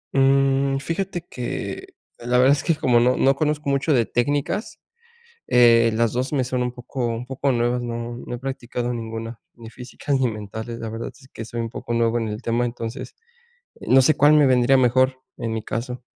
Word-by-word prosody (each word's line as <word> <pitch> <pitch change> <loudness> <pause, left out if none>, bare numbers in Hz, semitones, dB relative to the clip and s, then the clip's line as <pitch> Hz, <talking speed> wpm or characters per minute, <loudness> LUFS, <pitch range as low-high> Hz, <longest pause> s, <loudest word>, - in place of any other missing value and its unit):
Mm, 135 0 +3
fíjate 175 +4 -4
que, 125 -1 -6 0.2
la 120 +1 0
verdad 130 +2 +5
es 145 - +1
que 165 - +1
como 125 -6 +3
no 125 +2 +3
no 135 +1 +3
conozco 150 0 -1
mucho 140 +2 +1
de 120 -3 +3
técnicas, 145 - -2 0.7
eh, 115 -1 +5
las 115 0 +1
2 130 +3 -2
me 135 -3 +1
son 125 0 -2
un 125 - -2
poco 125 +1 -5
un 115 +2 -4
poco 135 +1 -1
nuevas, 120 +1 0
no 120 0 -5
no 120 0 -7
he - - -5
practicado 125 -2 -4
ninguna, 115 0 -6
ni 115 -2 -12
física 125 +4 -7
ni 130 -2 +2
mentales. 110 +2 -7
La 115 - -5
verdad 115 +1 -5
es 130 -3 -19
que 115 - -8
soy 115 +1 -5
un 115 - -3
poco 120 - -6
nuevo 115 0 +1
en 115 - -2
el 105 +2 -5
tema, 120 0 0
entonces, 115 -1 -6 0.7
no 135 +1 +5
sé 155 +4 +3
cuál 145 +1 +5
me 150 -2 +6
vendría 130 +1 +4
mejor 130 +1 +2 0.2
en 115 - -3
mi 110 -1 -2
caso. 125 +3 -5
125 Hz, 200 wpm, -22 LUFS, 115-135 Hz, 0.7 s, me